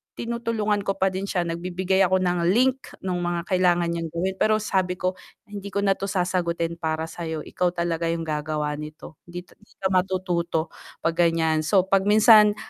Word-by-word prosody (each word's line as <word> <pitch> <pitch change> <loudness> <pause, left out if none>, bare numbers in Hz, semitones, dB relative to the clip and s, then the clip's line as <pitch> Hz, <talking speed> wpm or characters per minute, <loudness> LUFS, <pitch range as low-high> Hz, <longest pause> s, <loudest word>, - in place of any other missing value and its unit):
tinutulungan 230 -3 -1
ko 195 - +1
pa 190 - +2
din 190 +1 -3
siya, 180 -3 0
nagbibigay 180 +3 -1
ako 185 +1 +2
ng 175 -1 +1
link 260 +2 +2 0.2
nung 180 -2 -1
mga 175 -1 -1
kailangan 175 -2 +3
niyang 165 -1 -3
gawin, 185 +3 -1
pero 215 0 +3
sabi 185 -3 0
ko, 185 0 -1 0.3
"Hindi 205 -2 -8
ko 200 0 0
na 195 - +3
'to 195 - -3
sasagutin 175 -3 -1
para 160 -1 -1
sa'yo, 160 -3 -5
ikaw 180 -1 -1
talaga 170 -1 -1
'yung 165 0 -1
gagawa 150 -1 -2
nito, 155 +1 -10
hindi 175 +1 -7
'ta - - -23
hindi 210 - -24
ka 190 -1 -2
matututo 180 -3 0 0.3
pag 165 +1 -1
ganiyan." 160 -2 +2
So, 190 +1 +4
pag 195 0 +2
minsan 210 0 +7
180 Hz, 185 wpm, -24 LUFS, 170-195 Hz, 0.3 s, minsan